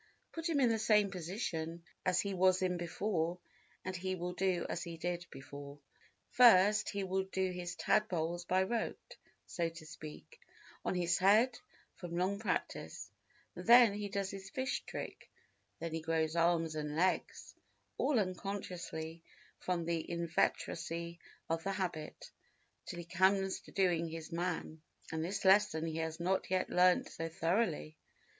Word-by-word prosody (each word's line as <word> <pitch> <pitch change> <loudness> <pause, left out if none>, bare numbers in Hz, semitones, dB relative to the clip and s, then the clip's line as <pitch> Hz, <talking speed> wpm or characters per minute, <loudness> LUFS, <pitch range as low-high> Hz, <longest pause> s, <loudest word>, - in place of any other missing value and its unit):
Put 330 +1 -3
him 305 -4 +2
in 250 -3 +5
the 225 -1 +1
same 210 -2 +4
position 170 -2 -4 0.2
as 180 0 +3
he 200 -1 -3
was 185 0 +4
in 180 -1 +1
before 175 0 -1 0.5
and 185 0 -3
he 185 +1 -2
will 180 0 -4
do 185 -1 0
as 170 - -3
he 170 -1 -6
did 175 +2 -3
before. 140 +1 -9 0.5
First 210 -4 +6
he 200 -1 -2
will 190 0 0
do 190 -1 -1
his 180 -1 -5
tadpoles 175 -1 +1
by 185 +1 +3
rote, 225 +3 -3 0.3
so 170 -2 -1
to 165 -1 -11
speak, 155 - -10 0.4
on - - -1
his 175 -1 +1
head, 220 +6 +5 0.4
from 170 -1 -5
long 190 +3 0
practice; 220 - -3 0.4
then 235 -2 +7
he 205 0 -4
does 200 -1 -2
his 195 0 -8
fish 260 +1 -2
trick; - - -7 0.5
then 165 -1 -5
he 160 - -2
grows 160 0 0
arms 165 -1 +2
and 150 -1 -3
legs, 185 +3 0 0.5
all 290 - +2
unconsciously 180 -4 -4 0.4
from 175 -2 -1
the 165 -1 0
inveteracy 170 0 -1 0.3
of 165 0 -1
the 195 - -1
habit, 175 -6 -4 0.6
till - - -5
he 175 - -6
comes 190 +2 +2
to - - -16
doing 175 -4 +2
his 165 +1 -7
man, 165 -2 -3 0.3
and 160 0 -2
this 195 +3 -3
lesson 190 -4 +5
he 160 -1 -3
has 160 0 -3
not 185 +2 0
yet 185 0 0
learnt 180 0 +4
so 165 0 -5
thoroughly. 165 -2 0
180 Hz, 155 wpm, -34 LUFS, 165-195 Hz, 0.6 s, then